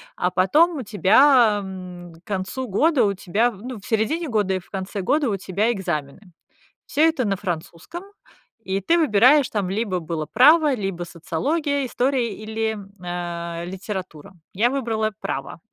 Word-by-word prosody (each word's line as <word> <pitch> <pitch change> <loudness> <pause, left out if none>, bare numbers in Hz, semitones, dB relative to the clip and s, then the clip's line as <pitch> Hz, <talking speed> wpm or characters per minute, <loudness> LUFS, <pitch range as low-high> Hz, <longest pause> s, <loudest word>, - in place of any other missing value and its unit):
а 180 0 0
потом 305 - +3
у 270 - -3
тебя, 220 +2 +5
м, 180 -2 -9
к 165 - -21
концу 205 +6 -3
года, 270 - +2
у 200 - +2
тебя, 200 +6 0
ну, 235 +5 -8
в - - -16
середине 285 +9 -1
года 205 -4 +1
и 185 - -1
в 175 - -20
конце 195 +1 -4
года 280 +5 +1
у 200 - -1
тебя 200 +5 0
экзамены. 175 -2 -4 0.6
Всё 285 - -3
это 315 -6 0
на 200 -2 0
французском, 180 - -6 0.6
и 190 +1 -1
ты 335 - +2
выбираешь, 260 0 +5
там 200 -4 -1
либо 195 -3 -1
было 160 -1 -4
право, 300 +5 +5
либо 195 -6 -3
социология, 280 - -2
история 245 -3 0
или, 220 0 -3 0.2
а, 170 -1 -4
литература. 190 -2 -7 0.2
Я 235 +6 +2
выбрала 225 -5 -1
право. - - -5
205 Hz, 155 wpm, -22 LUFS, 185-255 Hz, 0.6 s, тебя